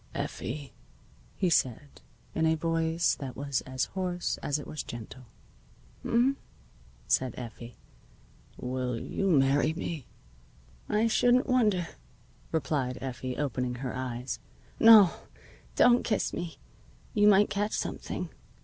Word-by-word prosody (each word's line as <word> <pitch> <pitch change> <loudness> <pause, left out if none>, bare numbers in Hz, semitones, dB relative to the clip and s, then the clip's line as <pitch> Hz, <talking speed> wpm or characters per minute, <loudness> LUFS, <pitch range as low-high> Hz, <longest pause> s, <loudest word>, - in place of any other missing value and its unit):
"Effie," 135 -1 -5 0.6
he 190 - +1
said, 140 -4 0 0.3
in 160 0 +2
a 160 - +3
voice 165 0 +1
that 135 -3 -6
was 140 -2 -2
as 130 -1 -1
hoarse 180 -2 -2
as 145 - 0
it 145 - -7
was 150 - -5
gentle. 120 +2 -9 0.8
"H'm?" 255 +4 +2 0.7
said 130 -1 +1
Effie. 120 -1 -8 0.8
"Will 125 -1 -3
you 195 +10 -2
marry 145 0 +3
me?" 160 -5 -5 0.8
"I 215 +2 +2
shouldn't 245 +3 +4
wonder," 210 -9 +2 0.6
replied 140 -5 -1
Effie, 130 0 -5
opening 125 -3 -1
her 125 0 -5
eyes. 125 0 -4 0.4
"No, 220 -6 +9 0.6
don't 245 0 +6
kiss 215 - -1
me. 175 -1 -5 0.6
You 210 -2 +4
might 205 0 +5
catch 205 +1 -1
something. - - -3
150 Hz, 120 wpm, -29 LUFS, 130-190 Hz, 0.8 s, No